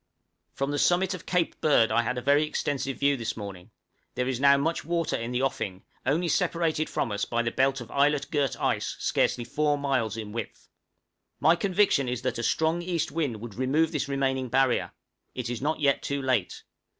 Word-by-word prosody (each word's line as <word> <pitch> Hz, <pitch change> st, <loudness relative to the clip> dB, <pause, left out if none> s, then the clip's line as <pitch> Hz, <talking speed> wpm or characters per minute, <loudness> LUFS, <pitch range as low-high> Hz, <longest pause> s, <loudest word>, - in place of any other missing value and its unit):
From 135 Hz, +1 st, -1 dB
the 145 Hz, -, -1 dB
summit 185 Hz, +2 st, +3 dB
of 180 Hz, -, -8 dB
Cape 180 Hz, -2 st, 0 dB
Bird 130 Hz, -8 st, +4 dB
I 115 Hz, +2 st, +3 dB
had 125 Hz, +2 st, -2 dB
a 125 Hz, -, -4 dB
very 145 Hz, +3 st, +4 dB
extensive 135 Hz, -3 st, -2 dB
view 140 Hz, 0 st, +3 dB
this 115 Hz, -3 st, -4 dB
morning: 100 Hz, -2 st, -8 dB, 0.5 s
there 125 Hz, 0 st, -1 dB
is 130 Hz, -2 st, -1 dB
now 140 Hz, 0 st, +6 dB
much 160 Hz, +4 st, -1 dB
water 170 Hz, +1 st, -1 dB
in 115 Hz, +1 st, -3 dB
the 125 Hz, +1 st, 0 dB
offing, 95 Hz, -8 st, -2 dB, 0.2 s
only 165 Hz, +6 st, +2 dB
separated 160 Hz, -1 st, 0 dB
from 115 Hz, -, -1 dB
us 100 Hz, 0 st, -2 dB
by 120 Hz, 0 st, 0 dB
the 115 Hz, -, -1 dB
belt 135 Hz, 0 st, +1 dB
of 120 Hz, -, -10 dB
islet 140 Hz, +1 st, +1 dB
girt 145 Hz, -5 st, 0 dB
ice -, -, -1 dB
scarcely 120 Hz, -, +1 dB
four 145 Hz, +4 st, 0 dB
miles 130 Hz, -6 st, -1 dB
in 110 Hz, -2 st, -6 dB
width! 115 Hz, -1 st, -7 dB, 0.7 s
My 165 Hz, +2 st, +5 dB
conviction 185 Hz, -8 st, +2 dB
is 125 Hz, -1 st, -3 dB
that -, -, -2 dB
a -, -, 0 dB
strong 160 Hz, +6 st, +1 dB
east 175 Hz, -2 st, -2 dB
wind 140 Hz, -9 st, -2 dB
would 115 Hz, -2 st, -7 dB
remove 140 Hz, +7 st, +1 dB
this 150 Hz, -4 st, -2 dB
remaining 130 Hz, -2 st, 0 dB
barrier; 135 Hz, 0 st, +2 dB, 0.4 s
it 125 Hz, -1 st, -3 dB
is 120 Hz, -, -4 dB
not 155 Hz, +3 st, -1 dB
yet 140 Hz, -2 st, +2 dB
too 140 Hz, 0 st, -2 dB
late. 130 Hz, -8 st, -1 dB
135 Hz, 200 wpm, -27 LUFS, 120-155 Hz, 0.7 s, now